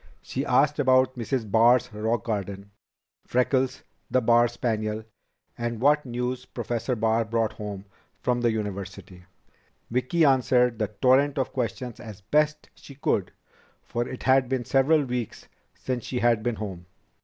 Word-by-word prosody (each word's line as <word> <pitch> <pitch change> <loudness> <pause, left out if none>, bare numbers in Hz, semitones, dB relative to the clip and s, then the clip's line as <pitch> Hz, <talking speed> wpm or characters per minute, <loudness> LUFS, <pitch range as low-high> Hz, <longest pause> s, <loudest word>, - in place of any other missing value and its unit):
She - - -3
asked 150 +1 +2
about 130 -1 +3
Mrs. 120 -3 -3
Barr's 120 +2 +4
rock 110 +1 -1
garden; 100 -2 -4 0.6
Freckles, 130 +1 +1 0.3
the 130 - +3
Barr 120 0 +4
spaniel; 110 -2 -2 0.5
and 120 -1 -3
what 145 +2 +3
news 125 +1 -3
Professor 120 +1 -3
Barr 115 +1 +1
brought 115 0 -1
home 100 -2 -7 0.3
from 125 -1 0
the 120 - +3
university. 100 -3 -6 0.7
Vicki 130 +7 +2
answered 125 -3 +3
the 105 - +1
torrent 130 +7 +2
of 135 - -1
questions 120 -1 -3
as 105 -3 -10
best 150 +8 +1
she 140 - -14
could, 105 -8 -1 0.5
for 120 +1 -3
it 130 - -7
had 130 -1 +3
been 130 -2 -1
several 145 +5 +3
weeks 125 -3 -4 0.3
since 125 -3 -4
she 125 - -3
had 120 -2 +2
been 120 +1 -1
home. 95 -5 -7
120 Hz, 145 wpm, -26 LUFS, 110-130 Hz, 0.7 s, Barr's